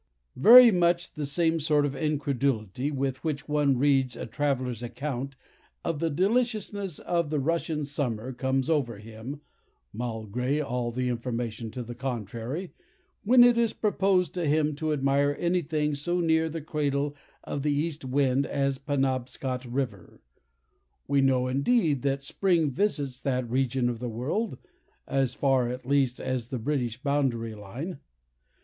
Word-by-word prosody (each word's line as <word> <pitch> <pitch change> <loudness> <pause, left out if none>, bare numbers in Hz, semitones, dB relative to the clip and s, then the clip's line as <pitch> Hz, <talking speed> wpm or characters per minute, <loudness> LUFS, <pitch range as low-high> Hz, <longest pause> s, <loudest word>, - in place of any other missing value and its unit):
Very 240 - +9
much 175 -2 +1
the 150 -2 -3
same 165 +3 +1
sort 150 -1 +2
of 140 - -2
incredulity 140 - -1
with 135 -2 -2
which 150 -3 -3
one 145 -3 +2
reads 135 -2 +2
a - - -5
traveller's 125 -2 -1
account 135 +2 -4 0.5
of 165 -3 -1
the 165 - 0
deliciousness 205 - 0
of 170 -3 -1
the 150 -1 0
Russian 155 0 -1
summer 130 -4 -3
comes 130 +1 0
over 140 -9 0
him, 115 +7 -8 0.5
(malgré 125 +5 -2
all 125 -2 -2
the 125 +2 -2
information 115 -2 -3
to 125 - -4
the 120 +1 -7
contrary,) 125 - -5 0.5
when 245 +3 +7
it 240 -1 +5
is 230 -2 +2
proposed 195 -4 +1
to 175 -3 -1
him 150 +1 +2
to 155 0 -1
admire 140 0 +2
any 175 +1 +1
thing 150 -1 -1
so 175 +5 -1
near 160 -1 +2
the 160 +1 -5
cradle 145 -1 -1 0.3
of 140 - -4
the 150 +1 +1
east 150 +1 -1
wind 135 +1 +1
as 140 -1 -1
Penobscot 130 -2 -2
River. 120 -6 -4 0.9
We 140 0 +3
know, 130 -2 +3
indeed, 145 - +2
that 135 0 -1
spring 165 -1 +1
visits 140 -6 -1
that 130 -2 -1
region 130 0 0
of 120 -2 -2
the 125 0 -4
world—as 135 - -3
far, 130 -3 +2
at 125 +1 -6
least, 135 -2 +1
as 125 -2 -3
the 130 - -3
British 120 -2 -2
boundary 130 -6 0
line. 125 - -7
140 Hz, 150 wpm, -27 LUFS, 125-155 Hz, 0.9 s, Very